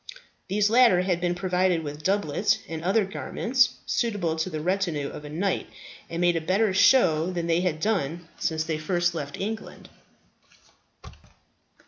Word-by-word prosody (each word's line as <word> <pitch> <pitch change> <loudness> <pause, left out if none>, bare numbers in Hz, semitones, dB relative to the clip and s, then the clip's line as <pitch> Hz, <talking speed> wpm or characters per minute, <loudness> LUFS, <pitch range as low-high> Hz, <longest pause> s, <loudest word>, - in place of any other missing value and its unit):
These 205 +2 +1
latter 230 -7 +5
had 180 -2 -1
been 175 0 0
provided 180 -2 +1
with 145 0 -7
doublets 195 +2 +1
and 160 0 -6
other 195 +4 +2
garments 235 +5 0
suitable 205 -9 -1
to 160 +3 -1
the 155 -3 -4
retinue 170 -4 -1
of 150 - -9
a - - -8
knight, 180 +5 -2 0.4
and 165 - -4
made 175 -1 +3
a 165 - 0
better 190 +5 +1
show 180 -6 +4
than 170 -2 -3
they 170 +1 +1
had 175 -4 -1
done 170 -4 -1
since 160 -1 -1
they 160 -1 -3
first 175 +2 0
left 145 -4 -6
England. 220 +3 -6
175 Hz, 155 wpm, -26 LUFS, 160-195 Hz, 0.4 s, latter